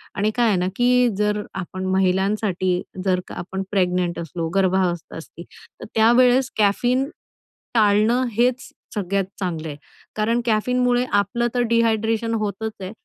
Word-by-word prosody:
आणि 210 Hz, +2 st, +1 dB
काय 240 Hz, -1 st, +3 dB
आहे 200 Hz, -4 st, +2 dB
ना 180 Hz, +1 st, 0 dB
की 250 Hz, 0 st, +3 dB
जर 210 Hz, 0 st, 0 dB, 0.2 s
आपण 185 Hz, +2 st, -6 dB
महिलांसाठी 190 Hz, -1 st, +1 dB, 0.2 s
जर 185 Hz, -1 st, +2 dB
का -, -, -9 dB
आपण 190 Hz, +2 st, -5 dB
प्रेग्नंट 180 Hz, -3 st, 0 dB
असलो, 165 Hz, 0 st, -4 dB
गर्भावस्था 185 Hz, -4 st, 0 dB
असती. 165 Hz, +1 st, -10 dB
तर -, -, -15 dB
त्यावेळेस 250 Hz, +3 st, +4 dB
कॅफीन 245 Hz, +7 st, +2 dB, 0.6 s
टाळणं 220 Hz, +3 st, +3 dB
हेच 245 Hz, +4 st, 0 dB, 0.3 s
सगळ्यात 195 Hz, -1 st, -1 dB
चांगलं 165 Hz, -4 st, -3 dB
आहे. 145 Hz, -1 st, -7 dB, 0.4 s
कारण 230 Hz, +3 st, +1 dB
कॅफीनमुळे 245 Hz, +2 st, +1 dB
आपलं 205 Hz, +4 st, +1 dB
तर 245 Hz, -, +2 dB
डिहायड्रेशन 225 Hz, 0 st, +1 dB
होतच 215 Hz, +1 st, -3 dB
आहे. 185 Hz, +1 st, -5 dB
210 Hz, 140 wpm, -22 LUFS, 185-235 Hz, 0.6 s, त्यावेळेस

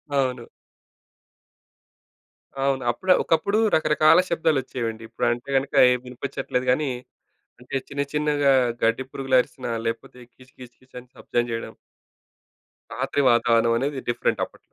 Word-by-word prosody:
అవును. 130 Hz, -3 st, -1 dB, 2.2 s
అవును. 135 Hz, -1 st, 0 dB
అప్పుడు, 185 Hz, +8 st, -1 dB
ఒకప్పుడు 200 Hz, +6 st, +1 dB, 0.2 s
రకరకాల 155 Hz, +1 st, +4 dB
శబ్దాలు 160 Hz, -3 st, +1 dB
వచ్చేవండి. 115 Hz, -3 st, -5 dB
ఇప్పుడు 115 Hz, -, -2 dB
అంటే 120 Hz, +3 st, -5 dB
గనుక, 135 Hz, +1 st, -2 dB, 0.2 s
ఏం 125 Hz, -, +1 dB
వినిపిచ్చట్లేదు 125 Hz, 0 st, -4 dB
గాని, 145 Hz, +2 st, 0 dB, 0.7 s
అంటే 125 Hz, +2 st, -6 dB
చిన్న 140 Hz, 0 st, -2 dB
చిన్నగా 150 Hz, -2 st, +2 dB, 0.3 s
గడ్డి 115 Hz, +3 st, +1 dB
పురుగులు 135 Hz, -1 st, 0 dB
అరిసినా 125 Hz, -2 st, -6 dB, 0.2 s
లేకపోతే 115 Hz, +2 st, -5 dB
కీచు, 130 Hz, 0 st, -20 dB
కీచు, 125 Hz, -1 st, -12 dB
కీచు 130 Hz, -1 st, -19 dB
అని 125 Hz, -, -20 dB
శబ్దం 120 Hz, -, -1 dB
జేయడం. 115 Hz, 0 st, -5 dB, 1.2 s
రాత్రి 145 Hz, -, -1 dB
వాతావరణం 115 Hz, -1 st, +3 dB
అనేది, 140 Hz, +3 st, -2 dB
డిఫరెంట్ 120 Hz, -, 0 dB
అప్పట్ -, -, -20 dB
130 Hz, 125 wpm, -23 LUFS, 120-145 Hz, 2.2 s, రకరకాల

